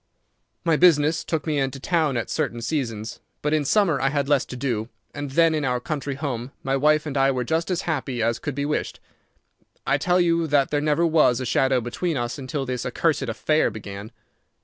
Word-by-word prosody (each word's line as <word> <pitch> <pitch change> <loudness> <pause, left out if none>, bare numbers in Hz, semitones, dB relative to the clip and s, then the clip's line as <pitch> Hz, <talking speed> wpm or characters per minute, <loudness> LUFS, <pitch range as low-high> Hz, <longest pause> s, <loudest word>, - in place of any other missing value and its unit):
My 165 -2 +3
business 160 -2 +4
took 160 -2 -2
me 150 -3 0
into 135 0 -2
town 155 -4 +1
at 115 - -2
certain 120 - -1
seasons, 115 -6 -3 0.2
but 150 +1 +1
in 155 -1 +2
summer 170 -2 +2
I 135 - +2
had 140 -1 -1
less 145 -2 +2
to - - -8
do, 120 -4 -2 0.2
and 145 -1 -5
then 165 +4 +3
in 155 -1 -1
our 125 -2 0
country 140 +1 -4
home 130 -3 -4
my 135 0 0
wife 150 +2 +3
and 145 -2 -4
I 135 0 +3
were 130 -2 0
just 160 +7 -1
as 180 -2 -1
happy 135 -6 -2
as 115 +1 0
could 145 -3 -4
be 140 0 -1
wished. 150 +1 -2 0.9
I - - +2
tell 180 0 +2
you 170 -2 +2
that 145 -2 +2
there 145 -1 +1
never 150 +3 +2
was 155 -7 +3
a 130 - -3
shadow 130 +1 +2
between 145 +7 -2
us 120 +3 -3
until 135 +1 -3
this 125 -1 -3
accursed 150 +5 0
affair 155 +7 +1
began. 100 0 -8
140 Hz, 210 wpm, -24 LUFS, 125-155 Hz, 0.9 s, business